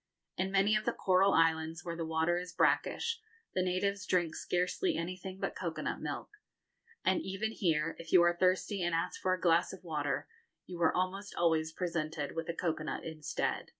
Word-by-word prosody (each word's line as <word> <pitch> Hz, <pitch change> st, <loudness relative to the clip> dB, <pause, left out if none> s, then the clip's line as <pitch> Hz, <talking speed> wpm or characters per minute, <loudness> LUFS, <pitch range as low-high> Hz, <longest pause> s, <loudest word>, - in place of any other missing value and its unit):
In 190 Hz, +1 st, -1 dB
many 195 Hz, +2 st, +4 dB
of 215 Hz, 0 st, 0 dB
the -, -, +1 dB
coral 190 Hz, +1 st, +3 dB
islands, 160 Hz, 0 st, +2 dB
where 170 Hz, -1 st, -3 dB
the 165 Hz, -1 st, -3 dB
water 160 Hz, +2 st, +1 dB
is 180 Hz, 0 st, -7 dB
brackish, 460 Hz, 0 st, +1 dB, 0.3 s
the 185 Hz, -, +1 dB
natives 185 Hz, +2 st, 0 dB
drink 175 Hz, -3 st, +2 dB
scarcely 180 Hz, -, 0 dB
anything 185 Hz, +2 st, -5 dB
but -, -, -2 dB
cocoa -, -, -3 dB
nut -, -, -2 dB
milk; -, -, -4 dB, 0.8 s
and 185 Hz, -, +3 dB
even 195 Hz, +3 st, -2 dB
here, 165 Hz, -6 st, 0 dB
if 165 Hz, -1 st, -9 dB
you 180 Hz, -2 st, +7 dB
are 175 Hz, 0 st, +4 dB
thirsty 185 Hz, +2 st, +1 dB
and 175 Hz, -1 st, +1 dB
ask 170 Hz, +2 st, -2 dB
for 185 Hz, 0 st, +2 dB
a -, -, -10 dB
glass 170 Hz, 0 st, +3 dB
of 190 Hz, -, -10 dB
water, 150 Hz, -4 st, -2 dB, 0.4 s
you 175 Hz, -1 st, -7 dB
are 160 Hz, -, +5 dB
almost 195 Hz, +3 st, -2 dB
always 160 Hz, -2 st, +2 dB
presented 160 Hz, -4 st, -2 dB
with 165 Hz, +1 st, -3 dB
a 170 Hz, -, -2 dB
cocoa 160 Hz, -3 st, -1 dB
nut -, -, -3 dB
instead. 155 Hz, -2 st, -3 dB
175 Hz, 190 wpm, -33 LUFS, 165-185 Hz, 0.8 s, you